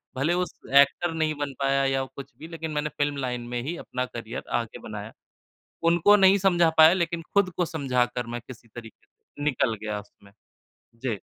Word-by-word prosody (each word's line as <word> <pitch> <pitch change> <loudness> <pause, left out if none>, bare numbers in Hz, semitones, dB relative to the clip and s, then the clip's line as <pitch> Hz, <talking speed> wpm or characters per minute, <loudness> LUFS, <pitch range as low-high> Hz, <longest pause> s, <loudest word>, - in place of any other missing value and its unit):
भलें 140 +6 +1
उस 180 0 -1 0.2
एक्टर 140 +5 +5
नहीं 155 -1 0
बन 145 -1 -3
पाया 135 0 +2
या 135 0 +1
कुछ 140 - -9
भी 160 - -9
लेकिन 165 -1 -6
मैंने 150 0 -1
फ़िल्म 145 -1 0
लाइन 125 -1 -2
में 120 - -1
ही 160 +5 -3
अपना 125 0 -3
करियर 120 0 -7 0.2
आगे 115 - -9
बनाया। 105 0 -7 0.8
उनको 200 +5 +5
नहीं 195 0 +6
समझा 175 -3 +3
पाया 160 +1 +9
लेकिन 170 -2 -1
खुद 200 -2 +3
को 180 - +2
समझा 135 -7 0
कर 125 -1 -3
मैं 120 - -3
किसी 120 -2 -12
तरीके 115 -2 -12
से - - -14
निकल 130 -5 +1
गया 105 -1 -3
उसमें। 100 -1 -20 0.6
जी। 115 -4 -4
140 Hz, 190 wpm, -26 LUFS, 120-165 Hz, 0.8 s, पाया